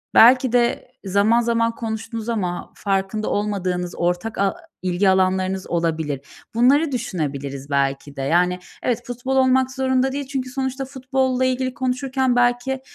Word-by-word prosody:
belki 250 +1 +7
de 245 0 +1
zaman 205 +5 +3
zaman 230 -1 +1
konuştunuz 225 0 -4
ama 180 -6 -2
farkında 195 +2 -1
olmadığınız 185 -4 -1
ortak 175 +6 -1
a 200 +6 +1 0.3
ilgi 185 +1 +2
alanlarınız 190 0 +1
olabilir. 160 -5 -1 0.3
Bunları 280 +6 +4
düşünebiliriz 140 - -4
belki 140 0 -1
de, 135 - -4
yani, 180 +5 +2 0.2
evet, 245 -1 0
futbol 250 +2 -3
olmak 260 0 +3
zorunda 260 0 +1
değil 280 -1 -4
çünkü 265 -2 -3
sonuçta 265 +1 -3
futbolla 260 -1 0
ilgili 255 0 0
konuşurken 260 0 0
belki 245 +2 +1
230 Hz, 135 wpm, -22 LUFS, 185-260 Hz, 0.3 s, belki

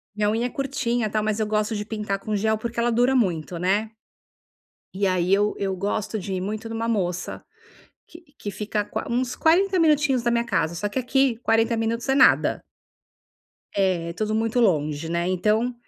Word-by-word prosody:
minha 210 -1 +1
unha 230 +3 0
é - - -6
curtinha, 245 -5 -1
tal, 215 0 -1
mas 215 0 -1
eu 215 - 0
gosto 215 +1 0
de 210 0 -3
pintar 210 -3 -3
com 210 +1 -3
gel 220 +1 +1
porque 235 +1 -4
ela 240 +1 +2
dura 245 +3 +3
muito, 175 -7 0
né 205 +5 0 1.0
e 195 +1 +1
aí 185 0 +1
eu 205 +1 +2
eu 195 -1 -2
gosto 205 +3 -2
de 195 0 -5
ir 185 - -2
muito 215 +4 -4
numa 225 0 -3
moça 180 -5 -2 0.6
que 335 - -13 0.2
que 205 - -5
fica 210 +1 -2
qua - - -5
uns 245 +1 -1
40 370 +4 +3
minutinhos 300 -6 +3
da 240 - +1
minha 235 0 +1
casa, 170 -7 0
só 205 +4 -2
que, 260 - -2
aqui, 260 -1 +1
40 225 +1 +2
minutos 230 +3 -2
é 270 - +3
nada. 275 - +4 1.1
É, 185 -4 +1
é - - -5
tudo 215 +4 -2
muito 225 +2 0
longe, 155 -7 +1
né, 170 +1 -1
então, 215 +7 +1
215 Hz, 195 wpm, -24 LUFS, 195-235 Hz, 1.1 s, nada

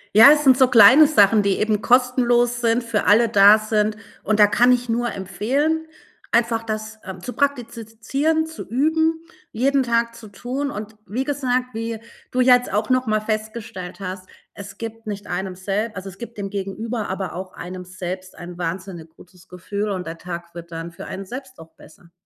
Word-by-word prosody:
Ja, 225 +7 +10
es 300 0 +3
sind 265 -3 +6
so 260 - +6
kleine 250 +5 +8
Sachen, 210 -7 +4
die 200 -1 0
eben 215 -1 0
kostenlos 245 -1 +2
sind, 230 +1 +1
für 230 -3 -1
alle 225 +3 +5
da 205 0 +7
sind. 215 0 -1 0.2
Und 215 0 0
da 210 - +9
kann 240 +4 +3
ich 245 0 +1
nur 240 +1 -1
empfehlen, 280 - -1 0.4
einfach 230 -1 +2
das, 220 0 -6
ähm, 190 -1 -8
zu 245 - -6
praktizieren, 275 +3 -1
zu 320 0 -8
üben, 320 +5 +1 0.3
jeden 270 +4 +1
Tag 235 -1 0
zu 230 -1 -12
tun. 250 +8 -4
Und 215 -2 -7
wie 240 +8 -2
gesagt, 255 -3 -1
wie 225 0 -4 0.3
du 255 - 0
ja 250 0 +7
jetzt 250 - -8
auch 210 +4 -1
noch 255 -1 +1
mal 215 0 +1
festgestellt 215 -3 -5
hast, 185 -1 -7 0.3
es 200 0 -10
gibt 225 -1 -8
nicht 205 -1 -5
einem 185 +1 -4
selb 205 +4 -3
also, 190 +1 -6
es 195 - -14
gibt 235 -2 -9
dem 195 -1 -5
Gegenüber, 210 +3 -4
aber 190 0 -4
auch 185 +1 -7
einem 180 +1 -8
selbst 185 +1 -7
ein 175 0 -9
wahnsinnig 170 -1 -5
gutes 180 +1 -19
Gefühl 200 +4 -4
und 185 -2 -3
der 165 0 -7
Tag 170 -1 -7
wird 170 0 -10
dann 165 +1 -6
für 170 - -10
einen 195 - -7
selbst 260 +5 -9
auch 160 - -13
besser. 170 +2 -19
220 Hz, 190 wpm, -21 LUFS, 195-245 Hz, 0.4 s, Ja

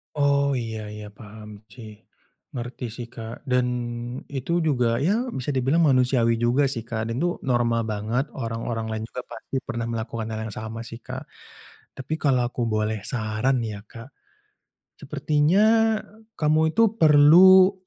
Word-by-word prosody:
Oh, 140 -1 +2
iya 110 -3 -4
iya 105 0 -8
paham 105 0 -11 0.2
cih. 110 -4 -12 0.6
Ngerti 120 +1 -5
sih 120 -2 -7
Kak 115 0 -8
dan 125 0 +3 0.7
itu 135 +3 -4
juga, 125 -7 +1
ya 220 - +1
bisa 130 +3 -3
dibilang 135 +5 +2
manusiawi 125 -5 +3
juga 120 +4 +2
sih 115 -4 -4
Kak 115 -1 -3
dan - - -3
itu 175 +2 0
normal 120 -2 +1
banget, 110 +5 -1
orang-orang 115 -1 -4
lain 110 0 -3
juga 125 - -5
pasti - - -9
pernah 120 0 -3
melakukan 115 -1 -4
hal 110 - -4
yang 105 - -8
sama 110 +1 -6
sih 115 0 -10
Kak, - - -7 0.7
tapi 135 +4 -5
kalau 130 -4 +2
aku 125 - -5
boleh 110 0 -1
saran 110 +3 -1
nih 115 -2 -3
ya - - -13
Kak, 115 +3 -11 0.9
sepertinya 155 +7 +2 0.7
kamu 155 +1 +2
itu 230 - +6 0.2
perlu 175 +6 +7
120 Hz, 150 wpm, -24 LUFS, 115-140 Hz, 0.9 s, perlu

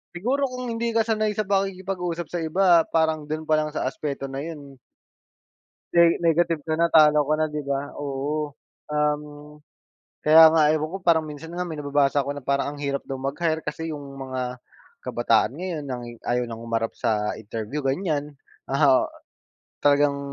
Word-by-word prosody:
siguro 260 +10 0
kung 250 0 -5
hindi 230 +1 -1
ka 225 - +4
sanay 215 -1 +1
sa 215 - 0
pakikipag-usap 185 -3 -2
sa 175 +4 -4
iba, 170 0 +4
parang 160 -2 +1
do'n 155 +1 -3
pa 155 - +4
lang 155 0 -1
sa - - -2
aspeto 140 -2 -4
na 135 0 -5
'yon 145 -5 -9 1.2
ne 170 0 +5
negative 165 -1 +2
ka 160 - 0
na, 170 - +4
talo 150 -2 +6
ka 155 +2 +2
na, 155 - +3
'di 150 0 -4
ba? 140 +1 -3
Oo. 145 +1 -3 0.4
Um, 150 0 -2 0.6
kaya 160 +1 +8
nga 155 -2 +5
ewan 155 +2 -1
ko 195 - -4
parang 165 -2 +3
minsan 150 +2 -9
nga 180 +1 -2
may 165 -3 -5
nababasa 145 -1 +2
ako 140 +1 -4
na 140 - -8
parang, 140 +1 0
ang - - -11
hirap 140 -1 -1
daw 135 - -5
mag-hire 155 +4 -2
kasi 160 +2 -4
'yong 145 -2 -6
mga, 130 -2 -5 0.4
kabataan 120 0 +2
ngayon 175 -5 -4
nang 125 -3 -5 0.2
ayaw 120 0 0
nang 115 0 -7
humarap 115 -1 -2
sa 105 -3 0
interview, 110 +6 -5
ganyan. 145 -1 -2 0.3
Oo. 135 -2 +4 0.8
Talagang 145 0 +4
150 Hz, 170 wpm, -24 LUFS, 140-165 Hz, 1.2 s, kaya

